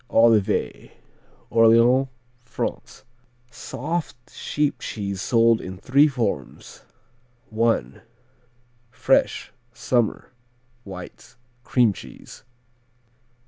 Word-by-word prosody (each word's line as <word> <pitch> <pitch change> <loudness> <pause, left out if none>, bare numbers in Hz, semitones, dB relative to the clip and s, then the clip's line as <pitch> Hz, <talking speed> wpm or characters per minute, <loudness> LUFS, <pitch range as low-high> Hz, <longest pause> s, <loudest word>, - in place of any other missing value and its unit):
Olivet 115 -3 +1 0.5
Orléans, 115 +4 +4 0.3
France 125 - -6 0.5
Soft 140 +1 -5
sheep 150 -1 -2
cheese 100 -3 -5
sold 115 0 +3
in 95 0 -8
three 140 +10 +4
forms: 105 - -4 0.7
I. 115 +1 0 0.9
Fresh; 115 - 0 0.2
summer, 120 -1 -1 0.5
white; 90 -3 -11 0.3
cream 120 -5 +2
cheese. - - -13
115 Hz, 70 wpm, -23 LUFS, 105-125 Hz, 0.9 s, Orléans